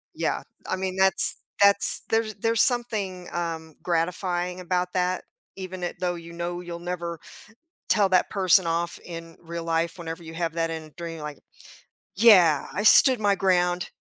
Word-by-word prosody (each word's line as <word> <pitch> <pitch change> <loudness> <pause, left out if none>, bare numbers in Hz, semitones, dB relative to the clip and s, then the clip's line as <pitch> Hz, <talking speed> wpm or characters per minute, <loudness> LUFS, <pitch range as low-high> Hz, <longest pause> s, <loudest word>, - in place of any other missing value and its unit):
Yeah, - - -1 0.3
I - - -1
mean 185 0 -4
that's 190 0 +2 0.2
that's, 200 0 +4
there's 225 -1 0
there's 225 +2 +2
something, 210 -8 +1
um, 165 -2 -4
gratifying 180 +1 -2
about 180 0 -2
that 180 0 -1 0.3
even 185 -1 -7
it 175 - -3
though, 180 -1 -1
you 170 -1 -10
know, 175 +1 -5
you'll 175 -1 -7
never 170 -1 -5 0.7
tell 200 -3 +3
that 185 -1 +3
person 190 -2 +4
off 170 +1 -2
in 165 -1 -9
real 170 0 -7
life 165 +2 -1
whenever 165 0 -7
you 160 0 -10
have 165 -1 -3
that 165 -1 -1
in 160 -1 -4
a - - -15
dream, 165 0 -8
like, 150 -1 -7 0.8
yeah, 185 -9 +6
"I 205 - -2
stood 250 +3 +7
my 205 -1 +3
ground." 180 -1 +1
175 Hz, 165 wpm, -25 LUFS, 170-190 Hz, 0.8 s, stood